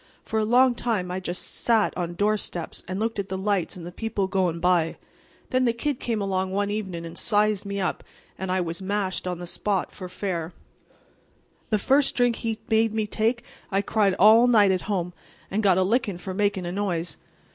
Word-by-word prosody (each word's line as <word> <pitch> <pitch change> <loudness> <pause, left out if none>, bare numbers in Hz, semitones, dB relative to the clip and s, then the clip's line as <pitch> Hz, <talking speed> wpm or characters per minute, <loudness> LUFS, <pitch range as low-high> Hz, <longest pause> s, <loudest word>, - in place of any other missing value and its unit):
For 220 - -1
a - - +2
long 250 +3 +5
time 220 -7 -1
I 185 - -2
just 180 -1 -3 0.2
sat 225 -3 +3
on 175 -1 -3
doorsteps 205 -3 -1
and 185 +2 -3
looked 225 -1 -1
at 200 - -3
the 190 - -2
lights 195 -2 0
and 175 -2 -8
the 175 - -7
people 210 0 -2
goin' 180 -3 0
by. 180 -1 +4
And 165 - -7 0.5
then 255 0 +3
the 235 - +3
Kid 270 +3 -2
came 230 -3 -1
along 190 -1 -1
one 200 +2 -1
evenin' 190 -5 -4
and 165 - -8
sized 210 -2 +1
me 200 0 -3
up, 185 - -2 0.3
and 190 -1 -4
I 185 0 +1
was 170 +1 -3
mashed 190 -1 -2
on 180 -1 -2
the 175 - -7
spot 195 +2 -2
for 185 - -8
fair. 180 -3 -3 1.2
The 215 - +3
first 270 +6 +2
drink 245 -2 +2
he 225 -1 -2
made 220 -1 +2
me 220 -1 0
take 230 +3 0 0.3
I 195 0 +1
cried 205 -3 +2
all 220 +6 +7
night 210 -5 +5
at 185 -1 0
home, 180 -3 -1 0.4
and 210 - +1
got 190 -4 +4
a 190 - +4
lickin' 205 -2 0
for 185 +1 -6
makin' 200 -2 0
a 175 - -3
noise. 180 -5 -2
200 Hz, 210 wpm, -25 LUFS, 180-220 Hz, 1.2 s, all